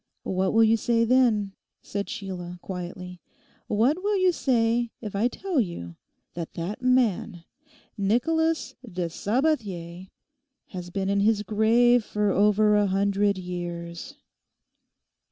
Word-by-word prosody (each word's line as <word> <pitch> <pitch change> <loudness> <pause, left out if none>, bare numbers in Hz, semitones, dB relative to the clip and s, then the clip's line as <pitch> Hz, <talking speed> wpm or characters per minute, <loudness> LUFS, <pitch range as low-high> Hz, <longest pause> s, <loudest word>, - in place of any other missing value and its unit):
'What 190 0 0
will 225 0 +5
you 225 +1 +4
say, 230 +1 +1
then,' 230 -5 +3 0.3
said 200 0 -4
Sheila, 185 -5 -6
quietly, 180 -1 -7 0.5
'What 250 - +2
will 415 0 +1
you 370 -1 +4
say 235 -6 +1
if 210 -3 -7
I 215 +4 +2
tell 360 +4 -2
you 130 - -6 0.4
that 170 -1 -6
that 175 +7 -4
man, 230 -8 +1 0.6
Nicholas 320 +11 +1
de 180 -7 -4
Sabathier, 195 - -2 0.6
has 180 -2 -7
been 190 +1 -2
in 200 0 +2
his 210 +1 +2
grave 230 +3 +3
for 210 -1 0
over 210 +2 +4
a 205 -1 +3
hundred 200 +1 +1
years? 175 +5 -6
205 Hz, 125 wpm, -26 LUFS, 185-240 Hz, 0.6 s, will